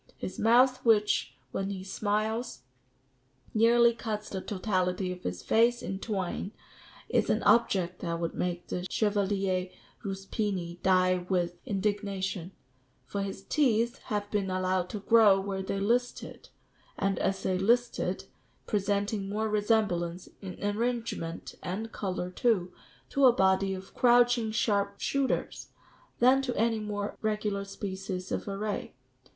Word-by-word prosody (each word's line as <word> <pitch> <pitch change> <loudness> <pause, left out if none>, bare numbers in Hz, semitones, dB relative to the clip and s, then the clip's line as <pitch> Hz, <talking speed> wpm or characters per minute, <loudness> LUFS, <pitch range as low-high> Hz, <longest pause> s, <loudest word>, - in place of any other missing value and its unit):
His 185 - -6
mouth 250 +3 +4
which, 215 -3 +3 0.2
when 195 +6 -2
he 190 -2 -5
smiles, 215 - -2 0.9
nearly 235 +1 +5
cuts 215 -2 -4
the 190 - -4
totality 185 -2 -1
of 180 0 -7
his 90 0 -4
face 235 +2 +3
in 190 0 -4
twain, 195 -1 -3 0.5
is - - +1
an - - +1
object 185 -6 +3
that 170 -1 -3
would 170 -1 -2
make 175 -1 -2
the 180 +1 -4
Chevalier 195 -3 0 0.3
Ruspini 195 -3 -3
die 185 -1 +3
with 175 -2 0
indignation; 195 -3 -2 0.5
for 200 - -3
his 195 0 -5
teeth 235 -1 +1
have 205 -1 -3
been 200 -2 0
allowed 185 -1 0
to 210 - -5
grow 210 -2 +6
where 195 0 -3
they 195 +1 -3
listed, 240 +5 -1 0.5
and 195 0 0
as 195 0 -1
they 185 -1 0
listed, 235 +5 +1 0.4
presenting 200 -1 -1
more 215 +2 -1
resemblance, 205 -5 0
in 185 -2 -7
arrangement 225 -6 -2
(and 205 +5 -4
colour 180 -2 -3
too), 185 -3 +1 0.4
to 275 -1 +5
a - - +8
body 190 -2 +2
of 190 +1 -10
crouching 245 -2 +4
sharp 200 -2 0
shooters, 275 -1 -1 0.5
than 260 +2 +5
to 250 -2 -3
any 225 0 +2
more 205 -1 -3
regular 210 -2 -1
species 190 -2 -5
of - - -2
array. 205 -4 -3
200 Hz, 135 wpm, -29 LUFS, 185-220 Hz, 0.9 s, a